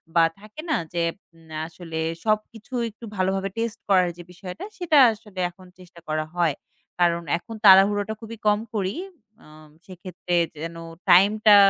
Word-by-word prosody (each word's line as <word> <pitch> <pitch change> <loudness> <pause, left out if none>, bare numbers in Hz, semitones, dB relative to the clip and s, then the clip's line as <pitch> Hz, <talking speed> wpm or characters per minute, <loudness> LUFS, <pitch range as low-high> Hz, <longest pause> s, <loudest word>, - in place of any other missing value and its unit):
বা 165 - +6 0.2
থাকে 215 +7 -10
না 310 - +2 0.2
যে, 170 -1 0 0.5
আ - - -2
আসলে 165 -1 -7 0.3
সবকিছু 215 +2 -2 0.2
একটু 220 +2 -12
ভালোভাবে 190 +1 0
টেস্ট 230 0 -2
করার 185 -2 +4
যে 175 - -9
বিষয়টা 180 +1 -8
সেটা 330 -5 +2 0.2
আসলে 210 -3 -11
এখন 185 +1 -17
চেষ্টা 180 -1 -15
করা 155 0 -1
হয়। 170 -5 +2 0.4
কারণ 170 -1 +3 0.2
এখন 225 +6 -10
তাড়াহুড়োটা 205 +2 +6
খুবই 225 0 -8
কম 210 0 +4 0.2
করি। 195 0 -1 0.5
আম 155 0 -16 0.2
সেক্ষেত্রে 180 -1 -5 0.3
যেন 165 0 -5 0.3
টাইমটা 210 +3 +7
190 Hz, 150 wpm, -24 LUFS, 175-215 Hz, 0.5 s, টাইমটা